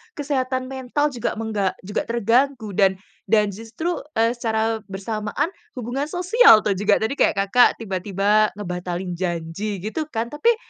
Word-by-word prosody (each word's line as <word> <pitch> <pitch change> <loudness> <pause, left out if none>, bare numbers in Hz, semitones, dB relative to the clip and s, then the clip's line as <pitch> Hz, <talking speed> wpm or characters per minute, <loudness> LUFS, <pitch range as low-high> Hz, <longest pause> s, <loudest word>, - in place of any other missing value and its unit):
kesehatan 260 -3 -2
mental 270 +3 -1
juga, 240 -4 -3
mengga 215 -4 -1
juga 200 +2 -3
terganggu 235 +1 +1
dan 195 -1 +3 0.3
dan 210 -2 +3
justru, 225 - -4 0.2
eee, 230 +1 +3
secara 225 -2 -1
bersamaan 215 - -3 0.2
hubungan 255 +4 -3
sosial 360 - +5
tuh 210 - +1
juga 205 +2 +2
tadi 230 +6 -2
kayak - - +3
Kakak 200 +5 +5
tiba-tiba 200 +2 +1
ngebatalin 180 -2 -4
janji, 175 +3 -3
gitu 295 +9 -3
kan, 235 -4 -3
tapi 460 +11 +2
220 Hz, 140 wpm, -22 LUFS, 200-260 Hz, 0.3 s, sosial